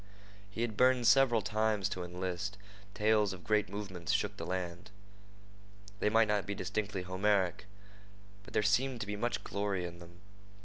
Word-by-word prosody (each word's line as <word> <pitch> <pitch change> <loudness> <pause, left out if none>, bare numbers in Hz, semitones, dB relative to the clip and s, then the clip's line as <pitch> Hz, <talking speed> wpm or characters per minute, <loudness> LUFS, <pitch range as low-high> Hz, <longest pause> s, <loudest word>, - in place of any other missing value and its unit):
He 105 +3 -5
had 115 -3 -2
burned 125 0 +4
several 120 -3 +5
times 105 0 +1
to 95 -2 -4
enlist. 90 +3 -4 0.4
Tales 105 -1 +3
of 90 -1 -10
great 105 -3 +1
movements 95 -4 -4
shook 105 -1 0
the - - -6
land. 90 +1 -4 1.1
They 105 - +2
might 110 +1 +4
not 105 -3 0
be 100 - -2
distinctly 100 -1 -3
Homeric, 95 +1 +1 0.7
but 100 - -13
there - - +3
seemed 120 +5 +2
to - - -2
be 105 0 -4
much 105 -2 -2
glory 100 -3 -2
in 85 0 -8
them. 85 +1 -14
100 Hz, 165 wpm, -33 LUFS, 95-110 Hz, 1.1 s, several